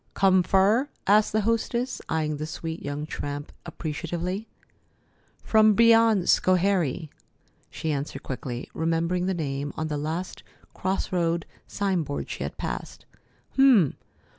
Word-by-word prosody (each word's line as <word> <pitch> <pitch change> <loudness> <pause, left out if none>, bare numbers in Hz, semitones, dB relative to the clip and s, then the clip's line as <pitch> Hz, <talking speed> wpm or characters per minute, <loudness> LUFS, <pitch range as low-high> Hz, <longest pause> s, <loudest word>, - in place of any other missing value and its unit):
"Come 190 -1 +4
fur?" 200 - +3 0.2
asked 210 +2 +4
the 215 - +1
hostess, 230 +3 -1
eying 155 -2 -1
the 155 +1 -4
sweet 160 +1 -5
young 145 +1 -4
tramp 145 -1 -5 0.2
appreciatively. 175 +5 -4 1.0
"From 215 -1 +5
beyond 225 -4 +5
Schoharie," 180 -5 +2 0.6
she 160 - -3
answered 140 -1 -4
quickly, 125 -2 -5
remembering 165 +2 0
the 190 - 0
name 145 -3 -3
on 160 0 -2
the 150 -1 -2
last 160 +5 -4 0.3
cross 190 +1 -2
road 170 -2 0 0.2
signboard 180 -8 -2
she - - -6
had - - -4
passed. - - -5 0.5
"H'm! 250 - +5
175 Hz, 125 wpm, -26 LUFS, 155-200 Hz, 1.0 s, From